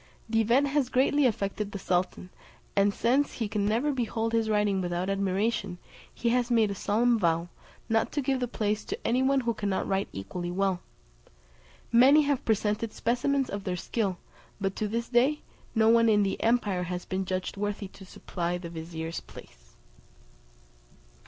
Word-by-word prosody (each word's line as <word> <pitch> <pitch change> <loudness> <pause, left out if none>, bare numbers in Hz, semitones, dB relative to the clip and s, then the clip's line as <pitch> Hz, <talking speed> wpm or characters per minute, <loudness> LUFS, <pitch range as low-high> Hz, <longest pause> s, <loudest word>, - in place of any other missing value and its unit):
The 225 0 +2
event 250 +6 +3
has 280 -3 +1
greatly 270 +2 +3
affected 205 -2 -2
the 200 - -4
sultan; 180 0 -1 0.4
and 200 0 +4
since 255 +7 +1
he 225 - -2
can 205 -1 -1
never 240 +8 +1
behold 230 -3 -2
his 225 -1 +1
writing 210 -2 +2
without 175 +2 -1
admiration, 195 0 -1 0.3
he 235 - -1
has 245 0 +1
made 225 -4 +3
a - - -1
solemn 230 +4 +2
vow, 170 -1 +1 0.4
not 225 -1 +1
to 290 - 0
give 265 0 0
the 250 - -1
place 215 -2 -1
to - - -4
any 250 +2 +2
one 270 0 +3
who 235 -1 0
cannot 200 -3 -2
write 195 0 0
equally 175 - -5
well. 190 0 0 1.1
Many 265 +6 +7
have 285 -2 0
presented 215 0 0
specimens 260 +3 0
of 200 -3 -5
their 180 -1 -2
skill; 195 -1 -2 0.4
but 195 -1 -2
to 215 - -1
this 230 +3 -2
day, 260 +5 +2 0.3
no 220 0 +4
one 230 0 +5
in 210 -1 +4
the 195 - -2
empire 220 -6 +1
has 180 0 -4
been 190 +1 -2
judged 185 0 -3
worthy 205 0 -3
to 195 - -14
supply 175 -1 -4
the 170 -2 -8
vizier's 165 0 -5
place." - - -15
210 Hz, 170 wpm, -28 LUFS, 190-240 Hz, 1.1 s, Many